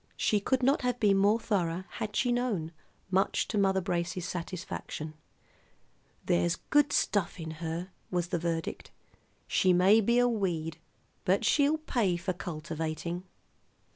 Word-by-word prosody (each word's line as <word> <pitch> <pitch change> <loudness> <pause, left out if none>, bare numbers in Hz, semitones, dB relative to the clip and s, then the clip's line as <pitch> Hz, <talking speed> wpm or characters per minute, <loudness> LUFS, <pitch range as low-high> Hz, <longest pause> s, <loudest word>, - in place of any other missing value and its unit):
She 210 - +2
could 255 +5 0
not 275 +3 +3
have 250 -1 -1
been 200 -3 +4
more 205 +3 +4
thorough, 185 -5 -1
had 210 -1 -5
she 245 +1 +2
known, 230 -10 -1 0.4
much 190 +1 +2
to 215 - -1
Mother 190 -1 +3
Brace's 175 -1 -2
satisfaction. 170 -3 -5 1.1
"There's 85 0 +2
good 295 0 +2
stuff 195 -3 +1
in 160 -1 -5
her," 170 +3 -4 0.2
was 175 -1 -1
the 175 -2 0
verdict. 165 -1 -3 0.6
"She 185 -1 +3
may 190 +5 +6
be 235 +3 +2
a 245 0 +5
weed, 170 -8 -1 0.4
but 195 +5 +2
she'll 290 +7 +3
pay 230 - 0
for 185 +2 -2
cultivating." 165 +1 -4
185 Hz, 140 wpm, -30 LUFS, 170-220 Hz, 1.1 s, may